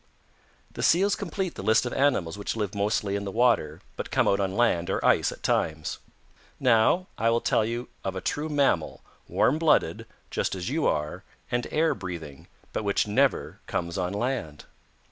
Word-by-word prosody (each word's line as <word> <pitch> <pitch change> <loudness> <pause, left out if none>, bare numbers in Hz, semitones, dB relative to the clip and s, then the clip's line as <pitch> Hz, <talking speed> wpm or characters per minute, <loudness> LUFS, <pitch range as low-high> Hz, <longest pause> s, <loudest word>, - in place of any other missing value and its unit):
"The - - -6
Seals 195 +4 +4
complete 190 -2 -3
the - - -7
list 110 +3 +3
of 120 - -3
animals 125 - +1
which 100 +1 -4
live 105 -2 -2
mostly 100 0 0
in 100 - -2
the 100 - -4
water 95 -9 +2
but - - -5
come - - +2
out 100 - +3
on 95 0 -1
land 95 -7 +2
or - - -1
ice - - +4
at - - -11
times. 80 -1 -1 0.6
Now 125 +8 +4
I 115 +1 +3
will 115 0 +3
tell 110 - +2
you 120 +2 -3 0.2
of 95 -1 -3
a - - -2
true 150 - -2
mammal, 140 - +1 0.3
warm 150 +5 +2
blooded, 160 -2 +2 0.2
just - - -1
as 90 0 -4
you 155 +1 +1
are, 75 0 -1 0.3
and 120 0 0
air 160 +1 +2
breathing, 80 -7 -8 0.3
but - - -2
which 100 -1 +1
never 130 +6 +1
comes 85 0 -2
on 90 -1 -1
land. 100 - -3
105 Hz, 185 wpm, -27 LUFS, 95-135 Hz, 0.6 s, Seals